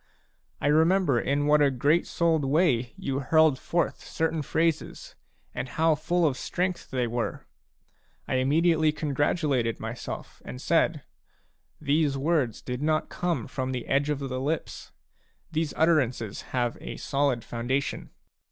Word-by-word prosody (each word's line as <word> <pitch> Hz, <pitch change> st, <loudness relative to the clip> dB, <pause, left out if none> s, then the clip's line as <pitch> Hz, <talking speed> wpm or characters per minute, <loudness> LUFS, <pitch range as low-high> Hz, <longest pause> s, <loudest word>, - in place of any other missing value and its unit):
I -, -, -4 dB
remember 160 Hz, -1 st, +3 dB
in 140 Hz, +4 st, 0 dB
what 150 Hz, 0 st, +4 dB
a 145 Hz, -, +5 dB
great 140 Hz, +6 st, +2 dB
souled 165 Hz, -3 st, +1 dB
way 135 Hz, -5 st, +2 dB
you 135 Hz, 0 st, -2 dB
hurled 155 Hz, -1 st, +3 dB
forth 170 Hz, 0 st, -1 dB
certain 160 Hz, -1 st, -1 dB
phrases, 160 Hz, +2 st, -1 dB, 0.4 s
and 130 Hz, -, -4 dB
how 160 Hz, +4 st, +2 dB
full 170 Hz, +3 st, 0 dB
of 135 Hz, -4 st, +1 dB
strength 180 Hz, 0 st, -2 dB
they 125 Hz, -2 st, 0 dB
were! 120 Hz, 0 st, -3 dB, 0.8 s
I 130 Hz, -, +1 dB
im 130 Hz, +1 st, +1 dB
mediately 160 Hz, 0 st, +3 dB
congratulated 145 Hz, -5 st, 0 dB
myself 115 Hz, +2 st, -7 dB
and 65 Hz, -1 st, -8 dB
said: -, -, +1 dB, 0.4 s
" -, -, -41 dB, 0.3 s
These 145 Hz, -1 st, +1 dB
words 140 Hz, -5 st, 0 dB
did 125 Hz, +1 st, -4 dB
not 155 Hz, +1 st, 0 dB
come 175 Hz, -1 st, -2 dB
from 130 Hz, -1 st, -3 dB
the 125 Hz, -2 st, -4 dB
edge 140 Hz, +2 st, +1 dB
of 150 Hz, -, 0 dB
the 130 Hz, -2 st, -4 dB
lips; 150 Hz, +4 st, -3 dB, 0.6 s
these 160 Hz, -1 st, -1 dB
utterances 130 Hz, -10 st, +1 dB
have 120 Hz, -2 st, -1 dB
a -, -, -6 dB
solid 135 Hz, -4 st, 0 dB
foundation. 125 Hz, +4 st, -2 dB
145 Hz, 145 wpm, -27 LUFS, 130-160 Hz, 0.8 s, a